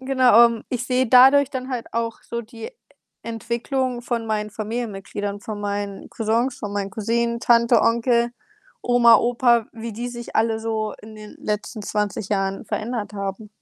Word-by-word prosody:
Genau, 255 -3 +5
ähm, 230 -1 -3
ich 245 -2 -3
sehe 255 0 +1
dadurch 265 +3 +7
dann 260 0 -5
halt 245 -3 -3
auch 230 0 -2
so 235 0 -5
die 225 0 -9 0.5
Entwicklung 240 +2 -3
von 235 -2 -3
meinen 215 -1 -2
Familienmitgliedern, 205 -2 -5
von 210 0 -6
meinen 205 -1 -4
Cousins, 230 +3 -1
von 205 -1 -5
meinen 200 -1 -3
Cousinen, 235 +2 -1
Tante, 235 -1 +4
Onkel, 235 +1 +2 0.5
Oma, 240 -2 +6
Opa, 235 0 +2
wie 230 0 -7
die 240 +3 -5
sich 240 -1 -7
alle 225 0 +1
so 220 -1 -2
in 215 +1 -12
den 215 -1 -11
letzten 210 +1 -4
20 210 -1 -2
Jahren 195 -1 -1
verändert 220 -1 -3
haben. 200 +1 -5
230 Hz, 160 wpm, -22 LUFS, 210-240 Hz, 0.5 s, dadurch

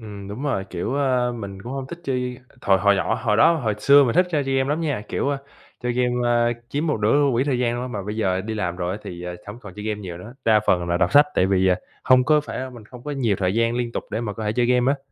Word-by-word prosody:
Ừm, 100 -3 -9
đúng 110 +7 -6
rồi, 130 -10 -1
kiểu, 90 +8 -3
ơ, 130 -3 +1
mình 100 -4 -7
cũng 120 - -7
hông 135 -1 -4
thích 170 +5 -9
chơi 125 -3 -2 0.2
hồi 95 -1 +4
hồi 100 +1 +4
nhỏ, 115 - 0
hồi 110 -2 0
đó, 170 - +6
hồi 110 -8 -1
xưa 140 +5 +6
mình 120 - 0
thích 180 +1 +4
chơi 150 -4 0
chơi 135 0 -1
game 130 0 +1
lắm 150 +3 0
nha, 145 -10 -1
kiểu, - - -1
a, 140 - -1 0.4
chơi 125 -1 -1
game, 125 0 +1
a, 120 0 +3 0.2
chiếm 145 +5 -2
một 150 -9 0
nữa 115 +8 +3
quỹ 120 +2 +1
thời 135 -4 0
gian 120 -1 0
luôn 125 -1 -5
mà 100 - -3
bây 105 - -4
giờ 95 -4 0
đi 110 +3 -4
làm 90 -5 -2
rồi 90 0 -2
á 100 - -5
thì, 85 -1 -7
ờ, 90 0 -5
hổng 105 +3 -8
còn 105 - -10
chơi 105 - -7
game 105 -1 -3
nhiều 90 -4 -7
nữa, 110 +7 -11
đa 110 -1 +5
phần 90 -1 +2
là 85 - +1
đọc 85 0 +1
sách 145 +1 +7
tại 95 - +3
vì, 95 -1 +2
à, 90 - +3 0.3
hông 130 -1 +5
có 150 +1 +4
phải, 150 - -7
a, 130 0 -4
mình 120 -4 -12
không 120 +3 -13
có 150 - -4
nhiều 120 -8 0
thời 95 0 0
gian 115 +1 +1
liên 120 -1 -2
tục - - -4
để 110 - -2
mà 110 -3 -3
có 110 +2 -6
thể 105 - 0
chơi 120 +1 +1
game 125 +2 +3
á. 145 - -4
120 Hz, 310 wpm, -23 LUFS, 100-130 Hz, 0.4 s, sách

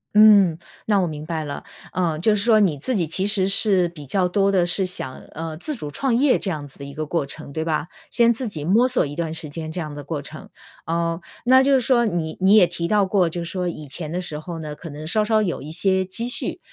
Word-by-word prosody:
嗯， 205 -6 +6 0.3
那 205 -2 +3
我 185 - +1
明 150 -2 -6
白 160 -2 -3
了。 145 - -6 0.3
呃， 170 -4 0
就 210 +6 +3
是 200 - -1
说 225 -1 +5
你 180 -8 +2
自 250 - -1
己 180 -5 +1
其 185 +5 -1
实 200 -2 +3
是 195 -2 +5
比 155 -4 -11
较 185 +6 +1
多 195 +2 +1
地 185 -3 +2
是 175 +3 +3
想， 155 -8 -1 0.2
呃， 160 0 -5
自 295 - -2
主 150 - -7
创 260 - 0
业 265 +2 +3
这 195 - -2
样 150 -5 -4
子 135 - -16
的 140 - -7
一 140 - -9
个 155 - -3
过 155 -1 -1
程， - - -9
对 160 - -2
吧？ 160 -1 -2 0.2
先 235 -1 +4
自 245 +2 -3
己 155 -8 -5
摸 220 +9 +4
索 250 -1 +1
一 145 0 -7
段 165 -1 -3
时 165 -1 -1
间 155 +1 -6
这 175 - -5
样 155 -3 -5
的 145 0 -8
过 145 +2 -4
程， 155 +2 -10 0.4
呃， 165 +1 -2 0.2
那 260 +2 +6
就 275 +1 +3
是 260 - +3
说 240 -1 +3
你 170 -6 -3
你 195 +3 +5
也 205 -4 +7
提 170 0 -4
到 205 +1 +2
过， 190 -3 +2
就 175 +1 -5
是 170 - -7
说 180 -2 -2
以 155 -3 -8
前 155 +2 -4
的 175 - -2
时 160 -5 -5
候 170 +2 -7
呢， 150 -2 -6
可 165 - -10
能 150 +1 -8
稍 215 +7 +1
稍 215 0 +2
有 180 -5 -3
一 150 - -8
些 190 +3 +2
积 225 +6 -1
蓄， 245 - -2
175 Hz, 285 characters per minute, -22 LUFS, 155-205 Hz, 0.4 s, 也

